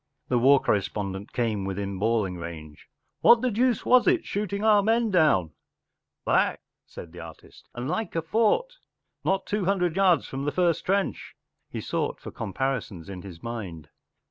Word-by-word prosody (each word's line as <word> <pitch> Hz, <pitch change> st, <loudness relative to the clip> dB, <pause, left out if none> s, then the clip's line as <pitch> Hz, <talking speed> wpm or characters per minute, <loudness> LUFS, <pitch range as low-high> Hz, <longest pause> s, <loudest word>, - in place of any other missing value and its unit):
The 125 Hz, -, +2 dB
war 135 Hz, +3 st, +6 dB
correspondent 100 Hz, -1 st, -2 dB
came 110 Hz, -5 st, -1 dB
within 95 Hz, 0 st, -4 dB
bawling 105 Hz, -4 st, 0 dB
range, 80 Hz, -3 st, -9 dB
“ -, -, -51 dB
What 235 Hz, 0 st, +6 dB
the 255 Hz, -, +1 dB
deuce 240 Hz, +1 st, +1 dB
was 250 Hz, 0 st, +5 dB
it? 360 Hz, -2 st, +3 dB
Shooting 200 Hz, 0 st, -3 dB
our 215 Hz, -2 st, +5 dB
men 225 Hz, +1 st, +1 dB
down 150 Hz, -, +3 dB, 0.3 s
!” -, -, -58 dB
“ -, -, -60 dB
Black,” -, -, +2 dB, 0.3 s
said 85 Hz, -, -10 dB
the 90 Hz, -, -11 dB
artist, 80 Hz, -2 st, -13 dB
“ -, -, -44 dB
and 120 Hz, +1 st, -4 dB
like 220 Hz, +4 st, -3 dB
a 165 Hz, -, 0 dB
fort 230 Hz, -, +1 dB, 0.5 s
Not 195 Hz, 0 st, 0 dB
two 205 Hz, -2 st, -1 dB
hundred 180 Hz, -3 st, +1 dB
yards 185 Hz, -5 st, +3 dB
from 135 Hz, +1 st, -5 dB
the 145 Hz, -, 0 dB
first 175 Hz, -1 st, +1 dB
trench*” 195 Hz, +1 st, -1 dB, 0.3 s
He -, -, -5 dB
sought -, -, -2 dB
for -, -, -9 dB
comparisons 105 Hz, -6 st, -3 dB
in 95 Hz, -2 st, -7 dB
his 90 Hz, -4 st, -11 dB
mind. 95 Hz, -10 st, -6 dB
135 Hz, 180 wpm, -26 LUFS, -, 0.5 s, war